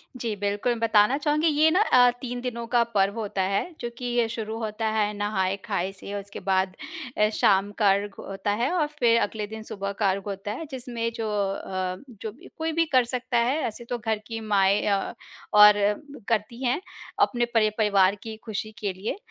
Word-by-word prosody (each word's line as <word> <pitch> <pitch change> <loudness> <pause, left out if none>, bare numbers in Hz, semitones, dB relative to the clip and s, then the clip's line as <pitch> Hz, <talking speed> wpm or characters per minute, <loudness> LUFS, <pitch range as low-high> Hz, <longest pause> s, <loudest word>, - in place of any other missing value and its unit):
जी, 230 -4 -3
बिल्कुल, 205 +4 0
बताना 225 +2 +4
चाहूँगी 300 +2 +1
ये 310 +1 +4
ना 365 - +3
अ, 250 - +6
3 245 -1 -4
दिनों 235 -2 -4
का 240 0 +3
पर्व 200 +2 +2
होता 200 -3 -2
है, 195 - -1
जो 240 - -3
कि 250 - -6
ये 240 -1 +1
शुरू 225 -1 -4
होता 220 0 -2
है 210 -1 +1
नहाए-खाए 195 -2 -1
से, 195 +1 -9
उसके 200 0 -9
बाद 190 0 0 0.4
अ, 210 - +4
शाम 200 0 +3
का 210 -3 +4
अर्ग 200 0 -2
होता 195 +1 -3
है 255 - +1
और 320 -5 +2
फिर 230 -1 +5
अगले 210 0 -2
दिन 220 +1 -8
सुबह 200 -2 -4
का 200 - +3
अर्ग 195 +1 -1
होता 195 +1 -4
है 285 +10 -5
जिसमें 240 -3 -3
जो 225 -1 -3 0.2
अ, 185 -1 -3 0.3
जो 220 - -4
भी 230 - -16
कोई 320 0 -1
भी 330 +1 +2
कर 255 -1 +5
सकता 250 0 -2
है, 240 +5 +2
ऐसे 235 +1 -8
तो 245 - -1
घर 220 -1 -1
की 225 -1 -4
माँएँ 200 -1 +3
अ, 200 +1 0 0.4
और 210 0 +9 0.5
करती 235 +3 -1
हैं, 250 +7 +1 0.4
अपने 240 -1 +3
परिप 215 -2 +3
परिवार 200 -3 +4
की 220 -1 -6
खुशी 215 -1 -4
के 200 -3 -2
लिए 195 - -4
220 Hz, 200 wpm, -26 LUFS, 200-240 Hz, 0.5 s, और